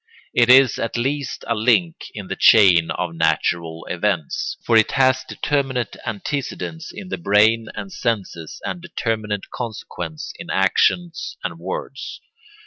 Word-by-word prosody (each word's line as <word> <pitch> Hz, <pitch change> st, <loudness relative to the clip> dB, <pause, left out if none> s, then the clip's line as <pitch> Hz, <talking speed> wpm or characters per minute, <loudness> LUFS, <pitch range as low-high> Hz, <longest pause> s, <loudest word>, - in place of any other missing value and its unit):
It 120 Hz, 0 st, +4 dB
is 130 Hz, 0 st, +6 dB
at 115 Hz, -, -2 dB
least 135 Hz, +2 st, -2 dB
a 115 Hz, -, +1 dB
link 125 Hz, +10 st, +1 dB
in 105 Hz, -2 st, -6 dB
the -, -, -4 dB
chain 90 Hz, -7 st, +6 dB
of 90 Hz, -2 st, -3 dB
natural 80 Hz, 0 st, 0 dB
events; 90 Hz, -4 st, -2 dB
for 115 Hz, -, +3 dB
it 110 Hz, -1 st, +4 dB
has 130 Hz, -1 st, +3 dB
determinate 135 Hz, -6 st, -2 dB
antecedents 145 Hz, +7 st, -4 dB
in 195 Hz, -3 st, -9 dB
the -, -, -4 dB
brain 110 Hz, -3 st, +3 dB
and 195 Hz, -, -7 dB
senses 100 Hz, -, -3 dB
and 175 Hz, -, -4 dB
determinate 110 Hz, -, -3 dB
consequents 90 Hz, -9 st, -6 dB
in -, -, -8 dB
actions 170 Hz, -, +1 dB
and -, -, -4 dB
words. -, -, -6 dB
115 Hz, 135 wpm, -21 LUFS, 95-140 Hz, -, is